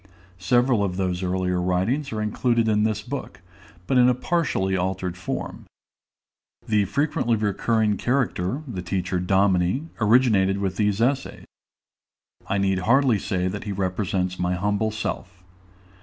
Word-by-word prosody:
Several 120 Hz, +3 st, +2 dB
of 90 Hz, -2 st, -2 dB
those 90 Hz, -1 st, -1 dB
earlier 90 Hz, -1 st, -1 dB
writings 95 Hz, +11 st, 0 dB
are 110 Hz, -1 st, -2 dB
included 115 Hz, +2 st, +1 dB
in 105 Hz, -1 st, +2 dB
this 105 Hz, -1 st, -1 dB
book, 135 Hz, -1 st, -6 dB, 0.5 s
but 130 Hz, +6 st, +2 dB
in 125 Hz, 0 st, +6 dB
a 125 Hz, -, +2 dB
partially 125 Hz, -, 0 dB
altered 95 Hz, -1 st, -2 dB
form. 90 Hz, 0 st, -5 dB, 1.0 s
The 105 Hz, -2 st, +2 dB
frequently 120 Hz, -, 0 dB
recurring 105 Hz, 0 st, 0 dB
character, 125 Hz, -, -1 dB
the 100 Hz, -8 st, -5 dB
teacher 90 Hz, 0 st, -2 dB
Dominie, 95 Hz, -, +1 dB
originated 105 Hz, -4 st, +3 dB
with 95 Hz, -2 st, -2 dB
these 105 Hz, 0 st, +1 dB
essays; 135 Hz, +3 st, -1 dB, 1.0 s
I 100 Hz, -, 0 dB
need 95 Hz, -1 st, +1 dB
hardly 120 Hz, +2 st, +3 dB
say 90 Hz, -1 st, -1 dB
that 100 Hz, +3 st, -5 dB
he 105 Hz, -, -3 dB
represents 95 Hz, -1 st, -2 dB
my 90 Hz, 0 st, 0 dB
humble 105 Hz, +3 st, 0 dB
self. 90 Hz, -4 st, -5 dB
100 Hz, 140 wpm, -24 LUFS, 95-115 Hz, 1.0 s, in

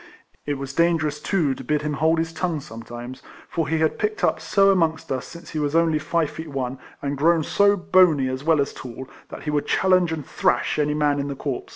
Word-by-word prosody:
It 145 Hz, -, 0 dB
was 135 Hz, 0 st, -6 dB
dangerous, 160 Hz, -2 st, +1 dB
too, 155 Hz, -4 st, +1 dB
to -, -, -9 dB
bid 150 Hz, -1 st, 0 dB
him 150 Hz, 0 st, -2 dB
hold 160 Hz, +3 st, +2 dB
his 165 Hz, 0 st, -2 dB
tongue 165 Hz, -1 st, -2 dB
sometimes; 120 Hz, -1 st, -9 dB, 0.3 s
for 165 Hz, -3 st, -2 dB
he 160 Hz, +2 st, 0 dB
had 160 Hz, 0 st, 0 dB
picked 425 Hz, -1 st, -2 dB
up -, -, +2 dB
so 195 Hz, -1 st, +4 dB
amongst 165 Hz, -6 st, 0 dB
us 130 Hz, -1 st, -2 dB
since 170 Hz, -1 st, -11 dB
he 155 Hz, -, -3 dB
was 145 Hz, +1 st, -1 dB
only 165 Hz, -2 st, +3 dB
five 155 Hz, 0 st, 0 dB
feet 160 Hz, -, -7 dB
one, 135 Hz, -3 st, -4 dB, 0.2 s
and 140 Hz, 0 st, -1 dB
grown 160 Hz, +3 st, +3 dB
so 200 Hz, +5 st, +3 dB
bony 175 Hz, -7 st, +4 dB
as 130 Hz, +1 st, -4 dB
well 160 Hz, -1 st, +3 dB
as 140 Hz, -, 0 dB
tall, 130 Hz, +1 st, -8 dB, 0.2 s
that -, -, -9 dB
he 150 Hz, -, -2 dB
would 145 Hz, -1 st, -1 dB
challenge 185 Hz, -3 st, +3 dB
and 155 Hz, -4 st, -4 dB
thrash 120 Hz, -, 0 dB
any 150 Hz, 0 st, +1 dB
man 145 Hz, -1 st, +1 dB
in 140 Hz, -, -2 dB
the 140 Hz, -, -4 dB
corps. 135 Hz, -2 st, -4 dB
150 Hz, 230 wpm, -23 LUFS, 140-165 Hz, 0.3 s, so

